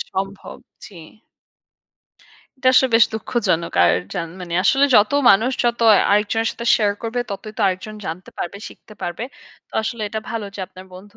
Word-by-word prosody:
সম্ভব 195 +1 -5 0.3
জি। 185 -5 -12 1.6
এটা 260 -1 +2
আসলে 260 +1 +5
বেশ 230 - +7
দুঃখজনক। 210 -7 -1
আর 85 - +4 0.2
যান 165 -1 -3
মানে 175 -1 -6
আসলে 275 +1 +4
যত 210 -1 +5 0.2
মানুষ 220 +6 +4
যত 235 0 0 0.3
আরেকজনের 210 +2 +1
সাথে 235 - -7
শেয়ার 205 -2 +1
করবে, 235 +2 -2
ততই 210 +2 -6
তো - - -5
আরেকজন 190 +3 -3
জানতে 175 +3 -6
পারবে, 175 +3 -4
শিখতে 215 - -16
পারবে। 175 +5 -4 0.5
তো - - -39
আসলে 220 0 -4
এটা 220 +1 -4
ভালো 230 -2 -3
যে 200 - -7
আপনার 185 0 -13
বন্ধু 205 +3 -14
210 Hz, 165 wpm, -20 LUFS, 185-230 Hz, 1.6 s, বেশ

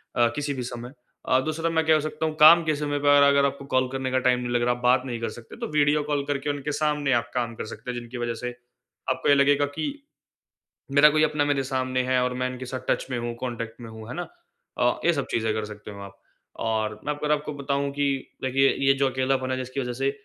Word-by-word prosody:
अ, 120 -1 +4
किसी 145 -1 -2
भी 130 -2 -4
समय। 120 +1 -7 0.4
अ, 130 - +5
दूसरा 160 +1 -1
मैं 160 -1 +1
क्या 160 0 +5
हो 155 - +2
सकता 155 +1 -3
हूँ 155 -1 -2
काम 165 +3 +9
के 155 -1 +1
समय 145 0 -2
पर 145 0 +5
अगर 140 0 +5
आपको 140 0 -3
कॉल 130 0 +3
करने 130 -1 -3
का 130 - +2
टाइम 125 -1 +3
नहीं 125 -1 -4
लग 120 - +2
रहा, 120 0 +2
आप 120 - -12
बात 125 +1 +4
नहीं 120 -3 -4
कर 115 - -1
सकते 115 - -12
तो - - -4
वीडियो 145 +1 +3
कॉल 145 -1 -1
करके 145 0 -2
उनके 145 +1 -2
सामने 150 -2 0
आप 120 - 0
काम 120 -2 -1
कर - - -5
सकते 120 +3 -7
हैं, 120 - -4
जिनकी 120 +1 -9
वजह 120 -1 -2
से 125 - -2 0.6
आपको - - 0
ये 145 - +7
लगेगा 145 +1 +4
कि 300 - -1 1.1
मेरा 145 +2 +7
कोई 155 +1 +2
अपना 150 -1 +1
मेरे 145 -2 +1
सामने 130 -1 -1
है 130 0 +2
और 125 0 -1
मैं 130 0 -1
इनके 130 0 -7
साथ 130 +1 -5
टच - - 0
में 125 - -1
हूँ, 120 0 -3
कॉन्टैक्ट 115 -2 -5
में 115 -1 -9
हूँ। 110 0 -10
है - - -6
ना? 175 - -3 0.6
अ, - - +2
ये 170 - +5
सब 140 - -2
चीज़ें 110 -1 0
कर 110 0 -2
सकते 105 0 -9
हो 100 -1 -10
आप। 100 0 -12 0.5
और 110 -1 -1
मैं 150 - -1
अगर 150 +1 -1
आपको 150 0 -1
बताऊँ 140 0 -1
कि 145 0 -1 0.4
देखिए 135 +1 +3 0.2
ये 135 - +7
जो 135 0 +1
अकेलापन 130 0 0
है 130 - 0
जिसकी 130 +2 -4
वजह 125 -2 -3
से 135 +3 0
130 Hz, 260 wpm, -25 LUFS, 120-145 Hz, 1.1 s, काम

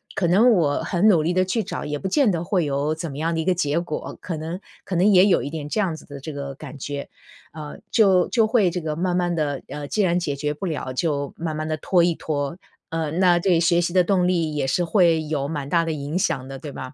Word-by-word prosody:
可 180 - +1
能 210 +8 +5
我 160 -9 +2
很 185 +3 +2
努 180 -7 +5
力 170 - +1
地 185 +1 +2
去 215 +4 -1
找， 195 - -5
也 150 0 -3
不 - - -3
见 270 +2 +3
得 170 -1 -2
会 180 -2 0
有 145 +2 0
怎 165 +1 -5
么 135 - -8
样 165 +2 0
的 165 - -1
一 160 - -2
个 185 - +3
结 150 -1 0
果。 170 -3 -5
可 170 - -4
能 165 +4 -5 0.3
可 185 - -3
能 185 +4 +4
也 190 -2 +6
有 190 - +3
一 140 - -4
点 150 -2 -6
这 215 - -1
样 185 -6 0
子 - - -13
的 140 -1 -9
这 155 +3 -7
个 140 -1 -6
感 145 - -10
觉， 140 +1 -5 0.5
呃， 150 -1 -8
就 190 -5 +4
就 230 -3 +3
会 215 -5 +3
这 180 0 -3
个 155 -1 -3
慢 180 +1 0
慢 175 -1 0
地， 145 -4 -1
呃， 145 +1 -6
既 215 - 0
然 180 -2 +2
解 145 -5 -2
决 150 +1 -2
不 150 - -6
了， 155 -6 -3
就 145 -1 -1
慢 160 -2 -3
慢 155 0 -3
地 155 - -1
拖 175 +3 +2
一 170 0 +3
拖。 145 0 -3 0.3
呃， 160 -2 -2
那 175 0 +4
对 175 -1 +2
学 170 +1 +3
习 175 +1 -2
的 185 - +5
动 180 0 +2
力 165 -4 0
也 140 - 0
是 135 +7 +1
会 170 -2 +3
有 150 -2 -2
蛮 145 -2 -4
大 170 0 +2
的 165 - -1
影 150 +3 -3
响 130 -8 -1
的， 135 0 -7
对 145 +2 -8
吧？ 130 0 -8
165 Hz, 290 characters per minute, -23 LUFS, 145-180 Hz, 0.5 s, 也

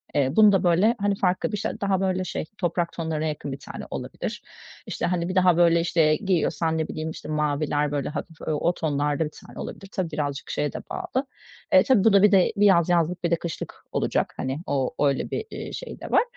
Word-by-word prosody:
Eee, 135 -2 +2
bunu 215 -1 +7
da 195 -1 +2
böyle, 185 +7 +4
hani 200 0 +1
farklı 185 +1 0
bir 210 - -2
şey 205 - -2
daha, 195 -2 +1
böyle, 185 -1 0
şey, 180 - -4
toprak 175 -1 -1
tonlarına 160 -2 -2
yakın 150 -2 -4
1 135 - -6
tane - - -8
olabilir. - - -5 0.5
İşte, - - -2
hani, 175 -1 -1
bir 185 - -3
daha 180 -2 +4
böyle, 170 -1 +5
işte, 165 -2 +3
giyiyorsan 165 -4 0
ne 160 - -1
bileyim, 155 0 -4
işte, 160 - -8
maviler 150 -1 0
böyle 145 -2 -2
hafif 160 +2 -6
o 155 +3 +1
tonlarda 145 -1 0
bir 150 - -6 0.2
tane - - -11
olabilir. 195 - -7
Tabii 180 -4 -2
birazcık 145 -2 -3
şeye 150 - -1
de - - -4
bağlı. 355 -8 -2 0.5
E, 280 -2 +7
tabii 255 -8 +3
bu 220 -2 +5
da 200 0 +6
bir 210 - +6
de 190 -3 +4
bir 205 0 +3
yaz 175 -4 +5
yazlık, 175 0 +1
bir 170 - 0
de - - +5
kışlık 165 -1 -7
olacak, - - 0
hani 130 +2 -3
o 135 -2 0
öyle 140 -1 -1
bir, - - -2
iii, - - -6
şey - - -7
de - - -8
var. - - +5
170 Hz, 225 wpm, -25 LUFS, 150-190 Hz, 0.5 s, bunu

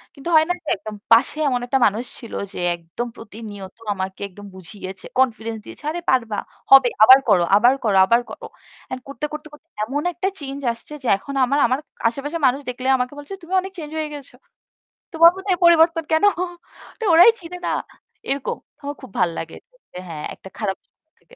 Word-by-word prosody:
কিন্তু 280 +4 -6
হয় 315 0 +6
না - - +3
যে - - -21
একদম 210 +2 -8 0.2
পাশে 235 +6 +5
এমন 250 -2 0
একটা 270 +2 +1
মানুষ 215 +3 +1 0.2
ছিল 230 - -11 0.2
যে - - -6 0.2
একদম 170 +8 -6
প্রতিনিয়ত 210 -4 -10 0.2
আমাকে 190 0 -5
একদম 205 +1 -13
বুঝিয়েছে, 190 +1 -9
confidence 230 -3 0
দিয়েছে, - - -12
"আরে 345 +2 -4
পারবা, 230 -5 +1 0.3
হবে, 270 -2 +9 0.2
আবার 260 +4 +10
করো, 190 -5 +4
আবার 240 +5 +5
করো, 205 -4 +2
আবার 235 +5 +3
করো।" - - -9 0.5
And 255 - -4
করতে, 280 +2 -5
করতে, 300 0 -6
করতে 295 +2 -16 0.2
এমন 270 +7 -2
একটা 375 +3 -2
change 280 -1 -7
আসছে 230 +6 -13
যে - - -4
এখন 280 +8 -9
আমার 280 +3 +1
আমার 255 +3 0 0.3
আশেপাশের 290 +7 -3
মানুষ 260 +1 +3
দেখলে 255 +1 -4
আমাকে 250 +2 -2
বলছে, 290 +6 -9
"তুমি 340 +3 -8
অনেক 385 +1 -8
change 305 -2 -7
হয়ে 310 -1 -2
গেছ। 285 -3 -10 0.8
তোমার 335 +1 +7
মধ্যে 385 +1 -3
এই - - -19
পরিবর্তন 330 -1 +5
কেন?" 315 +3 +3 0.8
তো - - -5
ওরাই 350 +8 +9
চিনে 360 0 -8
না, - - 0 0.6
এরকম। 275 0 -2 0.2
আমার 285 0 -5
খুব - - -11
ভালো 180 -2 +2
লাগে 165 - -7 0.4
যে - - -8
হ্যাঁ, 155 -2 -6
একটা 190 - -13
খারাপ 200 -3 -1
সময় 315 - -54
থেকে - - -21
255 Hz, 195 wpm, -21 LUFS, 215-305 Hz, 0.8 s, আবার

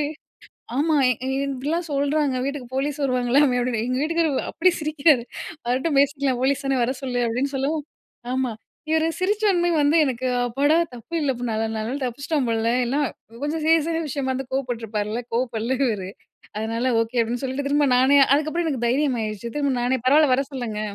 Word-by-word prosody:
போய் 290 - 0 0.7
ஆமா 315 +1 +2 0.5
இப்படிலா 280 +5 -2
சொல்றாங்க 285 -1 +1
வீட்டுக்கு 280 -3 -5
போலீஸ் 290 +2 -2
வருவாங்களாமே 255 +1 +2
அப்படின்னு 240 -2 -1
எங்க 255 - 0
வீட்டுக்காரர் 320 -3 0
அப்படி 370 +3 +3
சிரிக்கிறாரு 300 -4 +3 0.4
வரட்டும் 275 +4 +1
பேசிக்கலாம். 275 -3 +1
போலீஸ் 280 +1 +1
தானே 270 -1 +1
வர 260 - -1
சொல்லு. 245 -2 -1
அப்படின்னு 260 +5 -1
சொல்லவும். 290 +2 -1 0.5
ஆமா, 260 -2 0 0.4
இவர் 320 0 +2
சிரிச்சோன்னே 385 -2 +2
வந்து 290 +2 +3
எனக்கு 255 -2 -2 0.2
அப்பாடா 280 +6 +2 0.2
தப்பு 240 +7 -10
இல்ல, 285 -3 +1 0.2
நல்ல 220 0 -1
நாள் 240 +6 -3
தப்பிச்சிட்டோம் 280 +3 -1
போல 230 0 +1
இல்ல 250 +4 -1 0.5
கொஞ்சம் 305 +2 -2
சீரியஸான 325 +1 +2
விஷயமா 270 -1 -2
இருந்தா 260 0 -4
கோவப்பட்டுருப்பாருல்ல 230 -4 -2
கோவப்படல 240 0 -1
இவரு. 200 -5 -2 0.5
அதனால 230 +3 -1
ஓகே 230 +2 -2
அப்படின்னு 235 +2 -1
சொல்லிட்டு 265 +2 -3
திரும்ப 290 0 +3
நானே 265 +3 +5 0.2
அதுக்கப்புறம் 310 +3 0
எனக்கு 255 -6 -2
தைரியம் 260 +1 +1
ஆயிடுச்சு 215 +2 -5
திரும்ப 280 -2 +1
நானே 255 +2 +1
பரவாயில்ல 295 0 +5
வர 275 - +1
சொல்லுங்க. 235 -5 -4
270 Hz, 160 wpm, -23 LUFS, 245-295 Hz, 0.7 s, நானே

